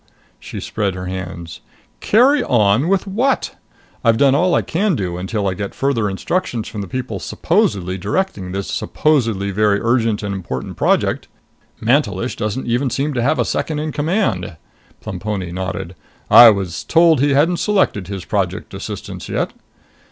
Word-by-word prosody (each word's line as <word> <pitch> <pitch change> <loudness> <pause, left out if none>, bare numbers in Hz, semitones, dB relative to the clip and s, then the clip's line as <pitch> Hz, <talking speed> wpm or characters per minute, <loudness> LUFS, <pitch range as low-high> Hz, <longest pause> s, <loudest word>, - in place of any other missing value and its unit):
She - - -8
spread 100 -3 -2
her 90 0 -6
hands. 90 -3 -6 0.4
"Carry 260 +7 +4
on 110 +4 +2
with 195 +1 +1
what? 235 +8 0 0.5
I've 115 -2 +4
done 135 0 +4
all 175 +5 +3
I - - +2
can 190 +2 0
do 90 -6 -3
until 100 +3 -2
I 95 - 0
get 100 +1 -5
further 125 -7 0
instructions 120 - -2
from 105 - -6
the 100 - -6
people 120 -3 -4
supposedly 95 0 0
directing 100 - -2
this 100 +1 -3
supposedly 115 -10 0
very 105 0 +2
urgent 115 -2 +1
and 100 -1 -2
important 85 -10 -5
project! - - +1 0.5
Mantelish - - +1
doesn't 110 +5 -3
even 120 +3 0
seem 145 +4 -1
to 120 - -1
have 140 +5 +2
a 120 - +1
second 155 - -2
in 155 +1 -2
command...." 145 - -1 0.4
Plemponi 95 -4 -4
nodded. 95 0 -4 0.4
"I 120 -1 +11
was 95 -5 -1
told 165 -3 +4
he 140 -1 +3
hadn't 165 +5 +3
selected 185 - +1
his 95 -2 -6
Project - - -2
assistants - - -7
yet." - - -2
110 Hz, 160 wpm, -19 LUFS, 95-150 Hz, 0.5 s, I